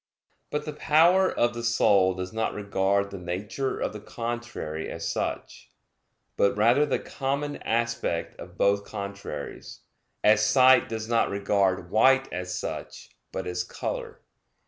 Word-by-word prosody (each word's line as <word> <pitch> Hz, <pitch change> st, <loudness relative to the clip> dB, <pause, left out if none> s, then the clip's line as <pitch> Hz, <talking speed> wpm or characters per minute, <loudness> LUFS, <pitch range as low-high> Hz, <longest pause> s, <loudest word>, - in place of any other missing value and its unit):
But 150 Hz, 0 st, -3 dB
the 150 Hz, -, -5 dB
power 170 Hz, +5 st, +4 dB
of 120 Hz, 0 st, +1 dB
the 120 Hz, 0 st, -6 dB
soul 100 Hz, -5 st, +3 dB
does 90 Hz, +1 st, -5 dB
not 110 Hz, 0 st, -1 dB
regard 100 Hz, 0 st, 0 dB
the 100 Hz, -, -6 dB
nature 100 Hz, +9 st, -3 dB
of -, -, -2 dB
the 105 Hz, -, -7 dB
contrary 115 Hz, -9 st, -5 dB
as -, -, -5 dB
such, -, -, -4 dB, 0.7 s
but 100 Hz, +1 st, +2 dB
rather 120 Hz, +8 st, +4 dB
the -, -, +1 dB
common 140 Hz, +2 st, -3 dB
aspect 115 Hz, -7 st, -2 dB
of -, -, -11 dB
both 100 Hz, 0 st, +2 dB
contraries; 100 Hz, -1 st, -7 dB, 0.4 s
as 105 Hz, 0 st, +5 dB
sight 130 Hz, +3 st, +5 dB
does 110 Hz, -1 st, -4 dB
not 115 Hz, 0 st, +2 dB
regard 95 Hz, -2 st, 0 dB
white 135 Hz, +4 st, +4 dB
as 90 Hz, 0 st, -4 dB
such, -, -, -6 dB, 0.2 s
but 95 Hz, -, -4 dB
as 90 Hz, 0 st, -2 dB
color. -, -, -5 dB
110 Hz, 145 wpm, -26 LUFS, 100-125 Hz, 0.7 s, as